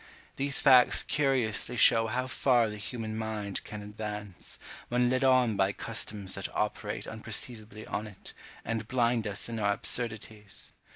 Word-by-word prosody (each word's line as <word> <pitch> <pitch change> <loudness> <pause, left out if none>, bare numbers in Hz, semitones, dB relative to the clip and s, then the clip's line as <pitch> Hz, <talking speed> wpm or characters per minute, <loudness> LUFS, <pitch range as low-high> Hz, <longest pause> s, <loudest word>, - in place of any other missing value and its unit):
These 140 0 +2
facts 125 -2 +6
curiously 125 -5 +1
show 115 0 +6
how 125 +3 -1
far 125 -2 +2
the 105 - -6
human 110 +1 -5
mind 110 -3 -3
can 105 -1 -7
advance, 105 -2 -6 0.3
when 125 0 +2
led 130 +1 +1
on 130 -4 +4
by 95 0 +2
customs 100 -2 -3
that 100 - -2
operate 105 0 -2
unperceivably 110 -1 -4
on 105 +3 -4
it, 100 -3 -10 0.3
and 110 -1 -3
blind 120 -2 +1
us 100 - -3
in 115 -1 -4
our 100 -1 +2
absurdities. 110 -2 -3
110 Hz, 150 wpm, -29 LUFS, 105-120 Hz, 0.3 s, facts